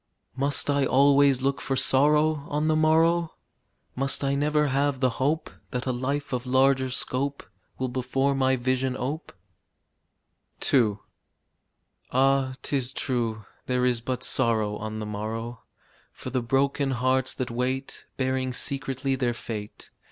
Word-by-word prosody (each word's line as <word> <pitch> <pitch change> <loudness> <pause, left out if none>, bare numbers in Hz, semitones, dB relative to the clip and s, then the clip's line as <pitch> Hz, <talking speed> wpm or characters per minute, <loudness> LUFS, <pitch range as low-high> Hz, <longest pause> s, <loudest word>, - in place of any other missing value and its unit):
Must 140 +2 +2
I 140 -1 +2
always 140 0 +4
look 135 -1 0
for 135 - -1
sorrow 150 +3 +3
On 150 +1 -1
the 155 - +3
morrow? 160 +2 +3 0.6
Must 135 +2 0
I 140 0 +1
never 150 +1 +1
have 140 0 0
the 130 -2 +2
hope 150 +4 0 0.2
That 125 -1 -3
a 130 - 0
life 140 +3 -3
of 125 0 -3
larger 130 0 +3
scope 135 +2 -1 0.3
Will 130 - -1
before 130 +2 0
my 130 -1 +2
vision 130 +1 -1
ope? 145 +6 -4 1.4
II. 110 -7 +4 1.1
Ah, 135 0 +2
'tis 135 -3 -1
true 115 -6 -2 0.2
there 125 0 +1
is 120 -2 +1
but 125 +1 -3
sorrow 110 -4 +1
On 110 0 -5
the 110 - -4
morrow 115 +3 -5 0.5
For 125 - -8
the 130 0 0
broken 135 +3 +1
hearts 130 +1 +1
that 125 -2 -3
wait, 130 +3 -3
Bearing 130 -1 -1
secretly 135 0 -2
their 125 -3 0
fate. 110 -3 -7
130 Hz, 140 wpm, -26 LUFS, 125-140 Hz, 1.4 s, always